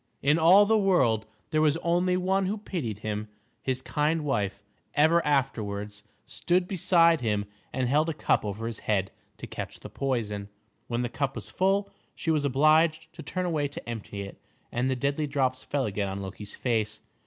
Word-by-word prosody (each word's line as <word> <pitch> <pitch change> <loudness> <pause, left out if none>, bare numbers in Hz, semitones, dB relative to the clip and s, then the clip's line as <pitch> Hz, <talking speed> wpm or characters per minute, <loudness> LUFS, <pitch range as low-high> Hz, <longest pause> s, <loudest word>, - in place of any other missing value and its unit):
In 150 +4 +4
all 185 +6 +7
the 220 +1 +3
world 130 - +2 0.2
there 155 -1 +2
was 155 0 +3
only 180 +2 +2
one 190 +1 +1
who 210 +3 -1
pitied 160 - -4
him. 105 0 -2 0.3
His 130 -1 -2
kind 150 +1 0
wife 100 -7 -1 0.3
ever 160 +3 +4
afterwards 105 -7 -1 0.2
stood 180 +1 0
beside 170 -4 +4
him 105 -3 0 0.3
and 130 -1 -1
held 150 +5 +2
a - - -1
cup - - +1
over 105 +2 -4
his 115 -1 -4
head 95 -3 0 0.3
to - - -7
catch - - -7
the - - -9
poison. 105 -7 -2 0.4
When 120 +1 -1
the - - 0
cup 135 +3 -2
was - - -6
full, 195 +2 +1 0.2
she 165 - -1
was 150 -2 +1
obliged 155 +3 +3
to - - -9
turn 185 -1 -3
away 155 -5 0
to 140 - -9
empty 110 -3 -5
it, 100 - -10 0.3
and 125 +2 0
the 130 - +1
deadly 140 +4 -1
drops 130 -2 0
fell 140 -2 -1
again 100 -1 -2
on 95 - -4
Loki's 100 +1 -6
face. 110 -4 -1
140 Hz, 185 wpm, -27 LUFS, 110-165 Hz, 0.4 s, all